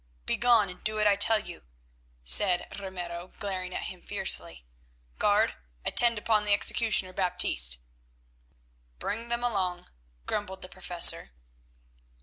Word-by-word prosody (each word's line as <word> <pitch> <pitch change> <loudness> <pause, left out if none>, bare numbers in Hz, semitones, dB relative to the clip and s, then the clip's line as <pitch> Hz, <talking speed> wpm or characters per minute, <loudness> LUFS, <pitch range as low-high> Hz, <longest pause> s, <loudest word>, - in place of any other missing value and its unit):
"Begone 235 -4 +2
and 180 0 -12
do 215 0 +2
what 215 0 -1
I 205 -1 +3
tell 220 +2 +3
you," 175 -5 -9 0.6
said 180 - +7
Ramiro, 180 -2 -8
glaring 185 -3 -5
at - - -5
him 180 -1 -9
fiercely. - - -4 0.5
"Guard, - - +1 0.3
attend 235 -2 +3
upon 215 0 0
the 205 -1 +1
executioner 205 -3 0
Baptiste." 60 - +3 1.2
"Bring 230 - -5
them 235 0 -3
along," 185 -6 -3 0.4
grumbled 190 -2 -5
the 185 - -8
Professor. 175 - +1
190 Hz, 125 wpm, -27 LUFS, 180-215 Hz, 1.2 s, said